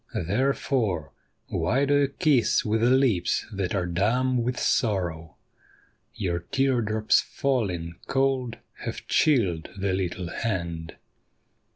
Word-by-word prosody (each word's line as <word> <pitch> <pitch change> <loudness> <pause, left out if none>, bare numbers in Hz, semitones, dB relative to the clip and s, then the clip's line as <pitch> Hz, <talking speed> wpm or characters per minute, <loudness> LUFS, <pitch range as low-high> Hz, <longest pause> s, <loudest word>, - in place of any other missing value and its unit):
Therefore, 105 - 0 0.4
why 135 +5 +1
do 140 - +2
you 145 -1 +4
kiss 140 -5 +2
with 110 +1 +1
lips 120 -7 +2
that 95 -1 -2
are 90 -3 0
dumb 120 +9 +1
with 120 +1 -2
sorrow? 85 - 0 0.8
Your 85 -3 -1
tear 130 +7 +1
drops 110 0 +2
falling 95 -12 -2
cold 135 -3 0 0.2
have - - -6
chilled 100 - +2
the 100 0 -1
httle 95 -2 -2
hand. 85 -7 -3
110 Hz, 110 wpm, -26 LUFS, 90-130 Hz, 0.8 s, you